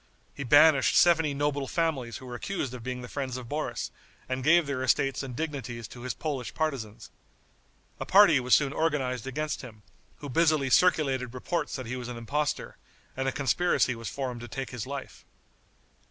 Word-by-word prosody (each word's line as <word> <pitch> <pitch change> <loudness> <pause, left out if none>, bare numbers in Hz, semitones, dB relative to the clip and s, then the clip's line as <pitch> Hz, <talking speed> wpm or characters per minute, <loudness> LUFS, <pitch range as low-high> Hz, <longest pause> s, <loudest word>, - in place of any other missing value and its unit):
He 140 - -6
banished 145 +2 +5
seventy 165 -4 +4
noble 145 -1 -1
families 145 -9 -1
who 130 - -12
were 125 - -8
accused 135 0 -3
of 125 - -7
being 125 +1 -5
the - - -7
friends 130 -1 -4
of 125 -2 -8
Boris, 150 +4 -3 0.4
and 130 0 -3
gave 170 +3 +5
their 140 -2 -3
estates 130 +1 +1
and 130 -3 -6
dignities 125 -7 -4
to 120 - -11
his 125 -2 -4
Polish 140 -6 -4
partisans. 115 -9 -3 0.9
A - - -3
party 190 -7 +7
was 125 0 +4
soon 140 -2 +1
organized 130 -7 -1
against 150 +3 -3
him, 110 -5 -12 0.3
who 145 - -9
busily 150 -1 +2
circulated 135 -8 +3
reports 170 +7 -2
that 130 -3 -5
he 120 +2 -4
was 125 -1 -6
an 125 -1 -6
impostor, 145 +6 -2 0.4
and 135 0 -2
a - - +2
conspiracy 145 -1 +1
was 115 -4 -6
formed 125 -2 -4
to 120 - -7
take 135 +3 -5
his 125 -1 -5
life. 140 -1 -7
135 Hz, 185 wpm, -28 LUFS, 125-150 Hz, 0.9 s, party